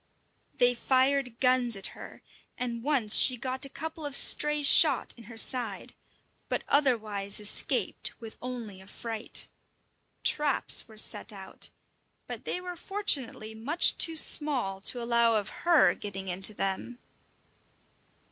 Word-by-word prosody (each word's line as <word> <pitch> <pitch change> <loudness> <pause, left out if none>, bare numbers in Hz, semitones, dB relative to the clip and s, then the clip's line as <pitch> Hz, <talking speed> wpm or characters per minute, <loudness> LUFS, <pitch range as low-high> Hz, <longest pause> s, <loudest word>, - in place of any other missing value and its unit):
They 245 0 +3
fired 260 0 0
guns 250 -3 +3
at 195 - -5
her, - - -13 0.3
and 235 -2 -4
once 250 -6 +2
she 255 - +6
got 260 +2 -3
a - - -10
couple 320 +3 -8
of 290 -2 -4
stray 300 +1 +4
shot 280 - +4
in 230 - -15
her 225 +1 -12
side, 230 -3 0 0.6
but - - -2
otherwise 215 -8 0
escaped 210 0 -2
with 225 -2 -10
only 235 -6 -8
a 190 - -17
fright. 225 +1 -5 0.8
Traps 295 -2 +3
were 220 - -16
set 215 - 0
out, 195 -2 -8 0.6
but - - -9
they - - -3
were 360 -1 -8
fortunately 285 - 0
much 265 +10 +3
too 330 -2 +5
small 260 -11 +1
to 245 - -1
allow 235 -1 +2
of 210 -2 -2 0.2
her 335 -3 +5
getting 195 -2 -8
into 190 +4 0
them. 195 +6 -4
245 Hz, 140 wpm, -28 LUFS, 215-280 Hz, 0.8 s, she